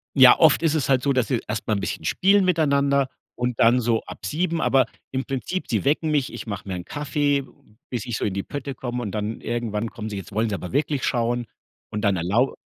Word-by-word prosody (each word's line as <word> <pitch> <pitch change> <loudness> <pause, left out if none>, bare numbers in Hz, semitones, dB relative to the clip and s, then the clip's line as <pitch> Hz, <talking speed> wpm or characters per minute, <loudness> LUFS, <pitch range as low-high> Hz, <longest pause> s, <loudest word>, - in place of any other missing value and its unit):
Ja, 130 -2 +8
oft 160 0 +5
ist 160 -2 +3
es 150 -4 0
halt 130 -2 +3
so, 140 - +2
dass 130 -3 +1
sie 125 -4 0
erst 105 0 -4
mal 110 - +2
'n 100 - -1
bisschen - - -4
spielen 195 +1 +3
miteinander 140 -5 +2 0.3
und 125 -1 -2
dann 120 +2 +5
so 115 -1 +1
ab - - -10
7:00, 165 +1 -1
aber 135 -2 +4 0.3
im 130 0 -2
Prinzip 135 +7 -3
sie - - 0
wecken 155 +3 +2
mich. 145 -4 0
Ich - - -7
mache 100 -1 -5
mir 95 - -3
'n 90 -1 -6
Kaffee, 145 -1 0 0.5
bis 125 -1 -3
ich 120 -3 -2
so - - -2
in 100 - -1
die 100 0 -2
Pötte 140 -1 -5
komme 125 -1 -4
und 105 -5 -4
dann 105 +1 -3
irgendwann 115 -2 -2
kommen 110 -1 -6
sie 100 - -5
jetzt 95 +1 -8
wollen 110 +2 0
sie 100 - -1
aber 90 - -6
wirklich 145 0 0
schauen 120 0 0 0.4
und 105 - -3
dann 100 -2 +2
erlau 105 +10 +1
125 Hz, 240 wpm, -24 LUFS, 110-140 Hz, 0.5 s, Ja